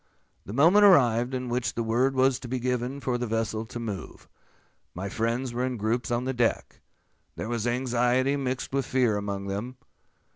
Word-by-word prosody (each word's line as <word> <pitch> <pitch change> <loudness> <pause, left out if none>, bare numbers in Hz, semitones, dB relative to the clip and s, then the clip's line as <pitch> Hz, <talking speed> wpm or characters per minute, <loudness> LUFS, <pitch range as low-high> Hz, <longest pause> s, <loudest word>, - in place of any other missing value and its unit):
The - - -6
moment 170 - +5
arrived 125 - +5
in 125 0 -3
which 120 0 -2
the 115 - -1
word 125 +4 +1
was 130 0 +3
to 125 - -8
be 130 +2 -2
given 125 +2 -2
for 125 -2 -1
the 120 - -2
vessel 110 0 -2
to 120 - -7
move. 105 -5 -7 0.7
My 95 +3 -4
friends 115 +4 -2
were 125 +1 -1
in 130 -1 -2
groups 110 +2 -1
on 120 +1 0
the 130 - -1
deck. 120 -2 -1 0.5
There - - -5
was 120 -1 -2
anxiety 125 +2 +1
mixed 130 -1 -3
with 135 -1 0
fear 125 -5 +2
among 100 -1 -3
them. 105 +6 -4
120 Hz, 185 wpm, -27 LUFS, 115-130 Hz, 0.7 s, moment